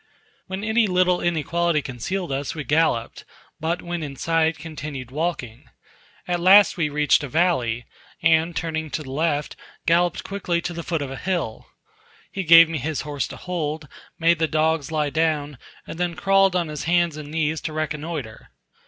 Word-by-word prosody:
When 190 +1 -5
any 220 0 +2
little 180 -1 +2
inequality 170 -1 0
concealed 165 - -4
us, 135 +2 -3
we 155 - -4
galloped; 145 -6 0 0.4
but 165 +3 -2
when 175 -1 -4
in 145 -3 -6
sight, 165 +2 +1
continued 145 -5 -7
walking. 140 -7 -3 0.6
At 175 -1 0
last 195 +4 +7
we 165 -5 0
reached 150 +1 +2
a - - -3
valley, 125 -7 +1 0.4
and 165 0 +3
turning 160 -2 -3
to 155 - -4
the 130 - -9
left, 150 0 -1 0.3
galloped 170 +1 +2
quickly 190 -3 -2
to 175 - -4
the 170 - -5
foot 165 -3 -2
of 135 - -6
a 135 - -6
hill; 170 -12 -3 0.6
he 195 - -3
gave 165 0 +9
me 160 -1 -3
his 150 +3 -2
horse 145 -3 -3
to - - -9
hold, 155 -4 -4 0.3
made 165 0 +3
the 160 - +2
dogs 155 -1 0
lie 150 -2 0
down, 150 -4 0 0.3
and 165 - -8
then 175 -1 -1
crawled 195 +1 +3
on 175 -2 +1
his 150 -1 -5
hands 170 -1 +2
and 150 -1 -8
knees 155 0 -1
to 160 - -4
reconnoitre. 150 -5 -5
160 Hz, 175 wpm, -23 LUFS, 150-175 Hz, 0.6 s, gave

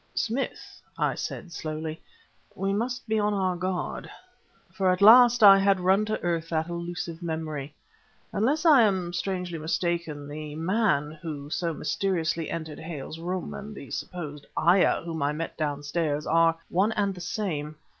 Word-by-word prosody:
"Smith," 240 +5 -3 0.2
I - - +1
said 180 - -6
slowly, 155 0 -5 0.5
"we 195 0 -1
must 240 +3 -2
be 220 0 +1
on 210 0 +1
our 185 -2 0
guard," 185 0 -3 0.6
for 190 0 +1
at 180 0 +2
last 240 +2 +8
I 195 -1 +10
had 195 -1 +3
run 190 +3 +3
to 215 0 -2
earth 165 -2 -1
that 160 0 -1
elusive 170 -1 -5
memory. 155 -4 -4 0.6
"Unless 280 - +1
I 295 -6 +8
am 190 -5 +1
strangely 180 -2 -3
mistaken, 160 -2 -2
the 150 0 -7
'man' 165 -3 +1
who 150 -3 -6
so 170 0 -1
mysteriously 170 -4 -1
entered 160 -2 -5
Hale's 160 -1 -7
room 180 +2 -4
and 215 +1 -8
the 140 - -10
supposed 150 -5 -6
ayah 175 +3 +4
whom 165 -2 -4
I 145 +1 +1
met 165 +2 -4
downstairs 145 0 -2
are 165 0 +3
one 200 +5 +2
and 200 -2 0
the 180 - -10
same. 155 -6 -3
175 Hz, 155 wpm, -27 LUFS, 155-195 Hz, 0.6 s, I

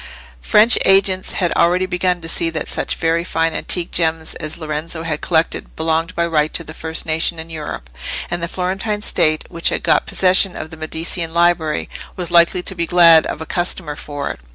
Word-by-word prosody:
French 220 +2 +5
agents 195 -1 +3
had 175 -3 0
already 180 +2 +2
begun 180 -1 -1
to 165 - -7
see 165 0 +2
that 160 -1 -4
such - - -1
very 165 0 0
fine 165 -2 -1
antique 175 +2 +1
gems 160 -1 0
as 155 0 -6
Lorenzo 160 +1 -5
had 155 -2 -3
collected 165 -1 -1
belonged 165 +2 -1
by 170 - +1
right 155 -2 0
to 165 - -1
the 155 - -10
first 160 0 -5
nation 160 +1 +1
in 160 +1 -6
Europe; 150 - -6 0.4
and 175 - -2
the 170 - -1
Florentine 190 +4 -3
State, 155 -6 +1
which 170 - 0
had - - -3
got - - +2
possession 185 0 +3
of 155 - -7
the - - -9
Medicean 160 +1 -4
library, 170 -3 +1 0.3
was 180 -2 -4
likely 175 +1 +4
to 190 - -6
be 170 -2 -2
glad 170 -2 +6
of 155 - -5
a - - -5
customer 175 -4 -3
for 145 -1 -5
it. - - -10
165 Hz, 200 wpm, -18 LUFS, 160-180 Hz, 0.4 s, glad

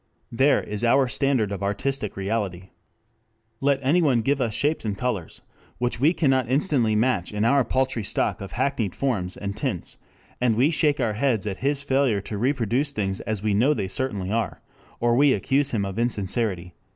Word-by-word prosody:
There 135 +5 +3
is 105 +2 -5
our 130 +3 +4
standard 125 -5 +1
of 100 - -4
artistic 105 +3 -2
reality. 95 -2 -3 0.9
Let 140 -1 +2
anyone 140 -4 +3
give 140 +2 +1
us 115 - 0
shapes 150 +2 0
and 105 -3 -3
colors 110 -7 -4 0.3
which 120 -1 -1
we 145 +5 +4
cannot 135 -8 +1
instantly 130 - +1
match 105 -5 +1
in 105 +1 -1
our 140 +3 +4
paltry 130 -1 -1
stock 100 -1 -1
of 100 - -7
hackneyed 125 -7 -1
forms 100 -10 -1
and 100 0 -4
tints, 110 - -4 0.4
and 120 -3 +3
we 135 +8 +3
shake 150 -3 +2
our 115 -4 0
heads 115 -2 0
at 100 -3 -3
his 140 +1 -1
failure 135 -6 +2
to 100 +1 -6
reproduce 130 +2 0
things 95 -5 -2
as 110 -2 -3
we 105 -1 +1
know 130 +9 +3
they 95 - -2
certainly 100 -3 -2
are, 115 0 -1 0.4
or 120 0 +2
we 140 +1 +5
accuse 135 +7 +1
him 105 -4 -1
of 95 +3 -4
insincerity." 100 -5 -1
120 Hz, 180 wpm, -24 LUFS, 100-135 Hz, 0.9 s, we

